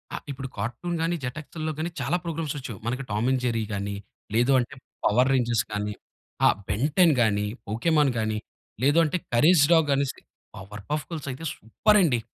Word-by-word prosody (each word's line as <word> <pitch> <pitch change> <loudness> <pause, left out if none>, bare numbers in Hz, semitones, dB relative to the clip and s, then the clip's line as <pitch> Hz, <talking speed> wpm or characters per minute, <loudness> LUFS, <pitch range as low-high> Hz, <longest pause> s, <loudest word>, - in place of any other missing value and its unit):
ఆ! - - -3
ఇప్పుడు 135 0 -5
కార్టూన్ 170 +9 -3
గాని, 170 +1 +1
జెట్‌ఎక్స్‌ల్లో 155 +4 -4
గాని 165 +2 -1
చాలా 150 +8 +1
ప్రోగ్రామ్స్ 160 -3 -3
వచ్చాయి. 120 -8 -7
మనకు 130 +3 -2
టామ్ 105 +3 0
అండ్ 130 - +1
జెర్రీ 115 -2 0
కానీ, 100 0 -3 0.4
లేదు 120 +4 +3
అంటే 125 +3 -3 0.3
పవర్ 125 +5 +4
రేంజర్స్ 120 -3 +1
కానీ, 105 0 -2 0.5
ఆహ్, - - +4
బెన్టెన్ 150 - +3
కానీ, 105 -2 +2 0.2
పోకేమాన్ 145 +6 +2
కానీ, 110 -1 -1 0.5
లేదంటే 160 +4 +4 0.2
కరేజ్ 150 +6 +6
డాగ్ 160 -3 +5
అనేసి 140 -1 -1 0.4
పవర్‌పఫ్ 105 +10 -5
గర్ల్స్ 155 -4 -6
అయితే 130 +6 -8
సూపరండి. 165 - +3
130 Hz, 155 wpm, -26 LUFS, 115-155 Hz, 0.5 s, కరేజ్